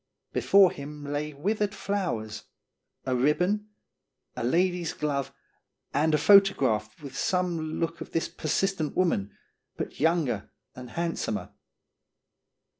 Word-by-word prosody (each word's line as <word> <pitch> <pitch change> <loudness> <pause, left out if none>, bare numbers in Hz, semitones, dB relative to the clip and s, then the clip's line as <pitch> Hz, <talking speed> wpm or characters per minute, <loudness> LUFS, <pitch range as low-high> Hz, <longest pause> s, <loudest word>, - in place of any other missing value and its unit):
Before 195 -2 +5
him 145 +1 -8
lay 145 +1 -3
withered 205 +7 -1
flowers, 170 - -3 0.6
a 130 -1 0
ribbon, 180 +11 +1 0.7
a - - -4
lady's 175 +5 +1
glove, 140 -2 -2 0.6
and 155 +1 +3
a - - +4
photograph 140 - +4
with 135 -2 -8
some 170 -2 -1
look 165 0 -2
of - - -7
this 165 - 0
persistent 160 0 -1
woman, 135 - +1 0.4
but - - -5
younger 150 - +1 0.2
and 125 -1 -9
handsomer. 165 -8 -3
155 Hz, 115 wpm, -27 LUFS, 140-180 Hz, 0.7 s, Before